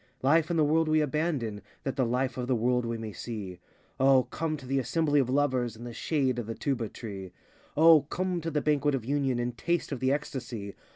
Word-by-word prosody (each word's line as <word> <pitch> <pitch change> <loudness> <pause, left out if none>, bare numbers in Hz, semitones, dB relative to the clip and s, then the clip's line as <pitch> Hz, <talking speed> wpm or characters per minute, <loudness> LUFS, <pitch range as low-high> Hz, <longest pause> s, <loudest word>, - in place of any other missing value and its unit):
Life 155 +4 +4
and 170 - 0
the 155 - +4
world 160 +2 +3
we 155 0 +3
abandon 145 -8 -1 0.2
That 135 - -2
the 130 -3 +1
Life 125 +1 0
of 125 -1 -3
the 130 - +2
world 125 +1 +1
we 115 0 -2
may 110 -2 -6
see. 95 -2 -6 0.4
O, 135 -1 +5
come 155 +2 -3
to 140 - -12
the 135 +1 0
assembly 145 +3 +1
of 130 -3 +1
Lovers 130 -4 +1
In 115 - -10
the 120 -1 -7
shade 130 -1 0
of 115 - -5
the 115 - -4
Tuba 125 -6 -2
tree. 95 -5 -8 0.4
O, 160 0 +8
come 180 +4 -2
to 165 - -2
the 150 -2 0
Banquet 145 -1 +2
of 120 -4 -4
Union 135 -2 0
And 120 0 -2
taste 170 +8 -1
of 135 - -3
the 130 +1 +2
ecstasy. 120 -8 -4
130 Hz, 225 wpm, -29 LUFS, 120-150 Hz, 0.4 s, O